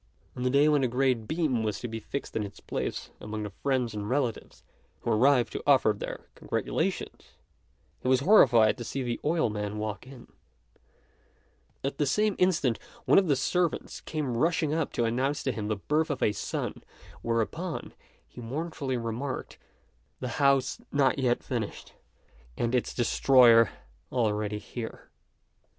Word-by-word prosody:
On -, -, -6 dB
the 125 Hz, -, +1 dB
day 140 Hz, +3 st, +4 dB
when 150 Hz, -2 st, +4 dB
the 130 Hz, -, +2 dB
great 125 Hz, -2 st, +1 dB
beam 155 Hz, -8 st, 0 dB
was 110 Hz, -1 st, -2 dB
to 120 Hz, -, -4 dB
be 115 Hz, -1 st, -5 dB
fixed 140 Hz, +5 st, -6 dB
in -, -, 0 dB
its 100 Hz, -1 st, -7 dB
place, -, -, -4 dB
among 105 Hz, 0 st, -5 dB
the 105 Hz, -, -5 dB
friends 125 Hz, +1 st, -1 dB
and 105 Hz, 0 st, -4 dB
relatives 125 Hz, -4 st, -2 dB, 0.4 s
who -, -, -1 dB
arrived 125 Hz, +2 st, +3 dB
to -, -, -3 dB
offer 130 Hz, -6 st, +5 dB
their -, -, -7 dB
congratulations, -, -, -3 dB, 0.7 s
he -, -, -5 dB
was 130 Hz, 0 st, +4 dB
horrified 125 Hz, -, +6 dB
to -, -, -4 dB
see 135 Hz, +3 st, -3 dB
the 120 Hz, -1 st, -2 dB
oilman 105 Hz, -10 st, 0 dB
walk 105 Hz, +3 st, -4 dB
in. 130 Hz, -3 st, -13 dB, 1.5 s
At 135 Hz, 0 st, -3 dB
the 145 Hz, -, +2 dB
same 210 Hz, +6 st, +2 dB
instant 155 Hz, -10 st, +2 dB, 0.3 s
one -, -, +6 dB
of 190 Hz, -, 0 dB
the 145 Hz, -, +3 dB
servants 175 Hz, +5 st, -1 dB
came 145 Hz, -6 st, -3 dB
rushing 155 Hz, +1 st, +1 dB
up 160 Hz, -2 st, -1 dB
to 120 Hz, -, +1 dB
announce 130 Hz, +5 st, 0 dB
to 130 Hz, -, 0 dB
him 110 Hz, -3 st, -4 dB
the 110 Hz, -, 0 dB
birth 150 Hz, +10 st, 0 dB
of 145 Hz, -, -2 dB
a -, -, +4 dB
son; 105 Hz, -, -4 dB, 0.4 s
whereupon, 115 Hz, +10 st, -2 dB, 0.3 s
he 125 Hz, -, -11 dB
mournfully 135 Hz, +1 st, -3 dB
remarked, 120 Hz, +4 st, -4 dB, 0.6 s
"The 125 Hz, -, -4 dB
house 135 Hz, -2 st, +3 dB
not 140 Hz, -2 st, +2 dB
yet 125 Hz, -2 st, +1 dB
finished, 115 Hz, -5 st, -4 dB, 0.6 s
and 120 Hz, +1 st, -1 dB
its 125 Hz, -, 0 dB
destroyer 120 Hz, -2 st, +5 dB, 0.4 s
already 105 Hz, -3 st, 0 dB
here." 110 Hz, +2 st, -8 dB
125 Hz, 160 wpm, -28 LUFS, 115-140 Hz, 1.5 s, horrified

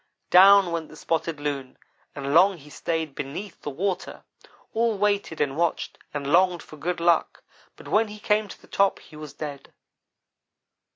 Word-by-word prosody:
"Down 195 Hz, 0 st, +7 dB
went 165 Hz, -2 st, -3 dB
the -, -, -13 dB
Spotted 165 Hz, -1 st, -2 dB
Loon, 140 Hz, -3 st, -4 dB, 0.4 s
and 140 Hz, 0 st, -3 dB
long 185 Hz, +3 st, +5 dB
he 150 Hz, -1 st, -15 dB
stayed 160 Hz, -1 st, -3 dB
beneath 155 Hz, +10 st, -7 dB
the -, -, -4 dB
water. 180 Hz, +6 st, -3 dB, 0.5 s
All 225 Hz, -1 st, +1 dB
waited 200 Hz, -5 st, 0 dB
and 140 Hz, -2 st, 0 dB
watched, 170 Hz, +1 st, -1 dB
and 145 Hz, -1 st, -4 dB
longed 180 Hz, -1 st, +3 dB
for -, -, -13 dB
good 175 Hz, +4 st, -3 dB
luck, 170 Hz, -1 st, +1 dB, 0.3 s
but -, -, -14 dB
when 220 Hz, +1 st, +2 dB
he 210 Hz, 0 st, -9 dB
came 210 Hz, 0 st, +1 dB
to -, -, -11 dB
the -, -, -19 dB
top 200 Hz, 0 st, +2 dB
he 155 Hz, -, -16 dB
was 150 Hz, -2 st, -9 dB
dead. 145 Hz, -3 st, -7 dB
170 Hz, 170 wpm, -25 LUFS, 150-200 Hz, 0.5 s, Down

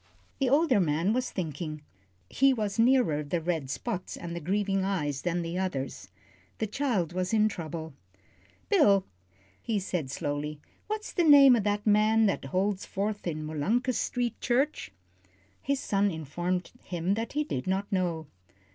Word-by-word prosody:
The 270 Hz, -2 st, +2 dB
older 280 Hz, -4 st, +4 dB
man 170 Hz, +4 st, +1 dB
was 255 Hz, +1 st, -1 dB
thinking. 155 Hz, -3 st, -5 dB, 0.4 s
He 270 Hz, -, +3 dB
was 210 Hz, -2 st, -2 dB
nearer 235 Hz, -, +4 dB
the 160 Hz, +4 st, -1 dB
red 160 Hz, -5 st, -2 dB
spots 185 Hz, -, -4 dB
and 170 Hz, -1 st, -6 dB
the -, -, -3 dB
grieving 195 Hz, +3 st, 0 dB
eyes 150 Hz, -8 st, -1 dB
than 175 Hz, 0 st, -1 dB
the 170 Hz, +2 st, -3 dB
others. 135 Hz, -, -4 dB, 0.5 s
The 220 Hz, -, -1 dB
child 210 Hz, -, -1 dB
was 185 Hz, +2 st, -2 dB
in 215 Hz, 0 st, +4 dB
trouble. 160 Hz, -5 st, -5 dB, 0.7 s
"Bill," 205 Hz, -, +4 dB, 0.6 s
he 225 Hz, -3 st, -1 dB
said, 180 Hz, -7 st, -2 dB
slowly, 145 Hz, +2 st, -3 dB, 0.3 s
"what's 430 Hz, 0 st, -4 dB
the 350 Hz, -, +2 dB
name 280 Hz, -4 st, +8 dB
o' -, -, +2 dB
that 205 Hz, 0 st, -1 dB
man 215 Hz, +1 st, +4 dB
that 195 Hz, -, 0 dB
holds 190 Hz, +6 st, 0 dB
forth 205 Hz, 0 st, -3 dB
in 155 Hz, -2 st, -3 dB
Molunkus 215 Hz, -, 0 dB
Street 245 Hz, -2 st, -2 dB
Church?" 265 Hz, -, 0 dB, 0.7 s
His 280 Hz, 0 st, 0 dB
son 200 Hz, -5 st, +1 dB
informed 175 Hz, +2 st, -3 dB
him 175 Hz, +1 st, -1 dB
that 225 Hz, +2 st, -3 dB
he 300 Hz, +1 st, +1 dB
did 135 Hz, -, -4 dB
not 195 Hz, +3 st, -1 dB
know. 175 Hz, -4 st, -1 dB
195 Hz, 155 wpm, -28 LUFS, 165-225 Hz, 0.7 s, name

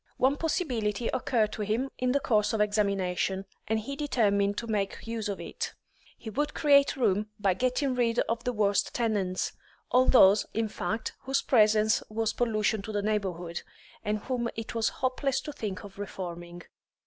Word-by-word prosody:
One 265 Hz, +2 st, +3 dB
possibility 245 Hz, -, -1 dB
occurred 225 Hz, -4 st, +1 dB
to -, -, -5 dB
him 225 Hz, +6 st, -1 dB
in 250 Hz, 0 st, +1 dB
the 280 Hz, -, +2 dB
course 210 Hz, -5 st, +1 dB
of 220 Hz, -, 0 dB
examination, 195 Hz, -2 st, 0 dB, 0.2 s
and 220 Hz, 0 st, +1 dB
he 275 Hz, +6 st, -5 dB
determined 205 Hz, -8 st, +1 dB
to 235 Hz, -, -3 dB
make 210 Hz, -3 st, -2 dB
use 225 Hz, -2 st, -3 dB
of 200 Hz, -, -3 dB
it; -, -, -5 dB, 0.4 s
he 220 Hz, -, -8 dB
would 295 Hz, +6 st, -1 dB
create 280 Hz, -2 st, +5 dB
room 210 Hz, -4 st, +1 dB
by 195 Hz, -2 st, +3 dB
getting 255 Hz, +6 st, 0 dB
rid 240 Hz, -2 st, +1 dB
of 230 Hz, +1 st, -2 dB
the 250 Hz, -, 0 dB
worst 205 Hz, -3 st, +1 dB
tenants, 205 Hz, -6 st, 0 dB, 0.4 s
all 255 Hz, +1 st, +5 dB
those, 205 Hz, -5 st, +6 dB
in 225 Hz, 0 st, 0 dB
fact, 220 Hz, +1 st, -3 dB
whose 270 Hz, +1 st, +1 dB
presence 215 Hz, -2 st, +4 dB
was 225 Hz, 0 st, -1 dB
pollution 220 Hz, -2 st, +1 dB
to 215 Hz, -, -6 dB
the 205 Hz, -1 st, -1 dB
neighbourhood, 185 Hz, -5 st, -2 dB, 0.4 s
and 210 Hz, +1 st, 0 dB
whom 240 Hz, +2 st, -2 dB
it 225 Hz, -1 st, -5 dB
was 230 Hz, -1 st, +1 dB
hopeless 260 Hz, +1 st, -1 dB
to 300 Hz, -, -7 dB
think 205 Hz, -9 st, -5 dB
of 200 Hz, -1 st, -12 dB
reforming. 175 Hz, -3 st, -6 dB
220 Hz, 170 wpm, -29 LUFS, 205-250 Hz, 0.4 s, those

